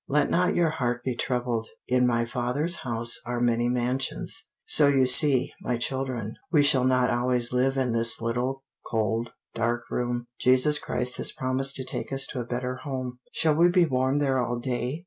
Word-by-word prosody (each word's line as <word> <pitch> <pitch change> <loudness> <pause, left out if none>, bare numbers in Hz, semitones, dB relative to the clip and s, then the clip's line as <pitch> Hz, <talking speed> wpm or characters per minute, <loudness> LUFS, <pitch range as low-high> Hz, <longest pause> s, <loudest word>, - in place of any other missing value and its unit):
'Let 150 +1 +1
not 180 +2 +2
your 170 -3 +2
heart 125 -4 -2
be 130 - -1
troubled; 120 -2 -2 0.2
in 125 0 +3
my 115 -1 +1
Father's 125 +9 -1
house 115 -1 -1
are 120 0 -3
many 120 0 +1
mansions.' 125 +2 -2 0.2
So 150 - +4
you 135 -2 +4
see, 130 0 +5
my 125 - -1
children, 125 -3 -3 0.2
we 150 -4 +5
shall 135 -3 +3
not 125 -1 +3
always 120 0 0
live 135 +2 +1
in 130 -2 +1
this 115 0 +2
little, 125 +4 -2 0.2
cold, 115 +1 -1 0.2
dark 120 +1 -1
room. 120 0 -2
Jesus 130 +4 +3
Christ 125 0 -2
has - - 0
promised 130 +1 -2
to 130 - -4
take 130 - -5
us 135 0 -2
to 130 - -4
a 120 - -3
better 125 +1 -3
home." 130 -2 -5
"Shall 160 -1 +2
we 170 +3 +5
be 175 -1 +4
warm 130 -1 +1
there 135 -3 +1
all 120 0 -1
day?" 125 +2 -2
125 Hz, 185 wpm, -26 LUFS, 120-135 Hz, 0.2 s, see